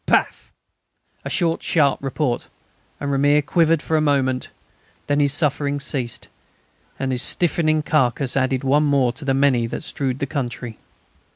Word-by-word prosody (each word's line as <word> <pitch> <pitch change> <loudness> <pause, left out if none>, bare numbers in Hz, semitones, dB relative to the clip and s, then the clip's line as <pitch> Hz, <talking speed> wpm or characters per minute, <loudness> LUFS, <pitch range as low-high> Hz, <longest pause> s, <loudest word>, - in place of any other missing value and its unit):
Paff! - - 0 0.7
A - - -5
short, 170 -3 0
sharp 145 -4 +1
report, 135 -2 -2 0.5
and 145 -1 -3
"Ramier" 145 +2 +3
quivered 165 -1 +2
for 160 - -1
a - - +2
moment. 135 -4 0 0.6
Then 145 0 0
his 145 -1 +3
sufferings 145 -1 0
ceased, 130 -5 -3 0.7
and 135 -1 -2
his 125 -1 +1
stiffening 155 -2 +2
carcase 135 -3 +1
added 130 -1 0
one 140 +3 +3
more 140 -4 +2
to 140 +5 -9
the 135 -1 0
many 130 -4 +2
that 115 - -6
strewed 135 -4 -3
the 140 - -2
country. 125 -5 -5
140 Hz, 155 wpm, -21 LUFS, 130-150 Hz, 0.7 s, Ramier